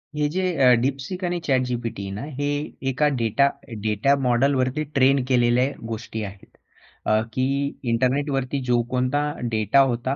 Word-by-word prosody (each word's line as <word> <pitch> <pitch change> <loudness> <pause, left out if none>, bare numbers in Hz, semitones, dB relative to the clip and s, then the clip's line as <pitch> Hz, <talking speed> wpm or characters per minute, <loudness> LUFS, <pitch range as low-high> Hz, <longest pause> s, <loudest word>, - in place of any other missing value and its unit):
हे 150 0 +1
जे 190 - 0 0.2
अ, 130 -2 +6
DeepSeek 135 +8 -3
आणि 175 0 -1
ChatGPT 125 -5 -1
आहे 100 0 -5
ना 100 +3 -5 0.2
हे 145 - -1 0.4
एका 140 +3 +2
डेटा 115 +4 +2 0.3
डेटा 110 +6 +2
मॉडेल 125 +2 +2
वरती 130 +3 0
ट्रेन 135 0 +4
केलेल्या 125 -1 +3 0.2
गोष्टी 110 -1 -5
आहेत. 100 -1 -11 0.5
अ, 110 0 +3
की 130 +2 +1 0.5
इंटरनेटवरती 135 +2 0
जो 120 -1 +4
कोणता 130 +3 +1 0.3
डेटा 110 +4 +2
होता. 120 +3 -2
130 Hz, 150 wpm, -23 LUFS, 115-140 Hz, 0.5 s, अ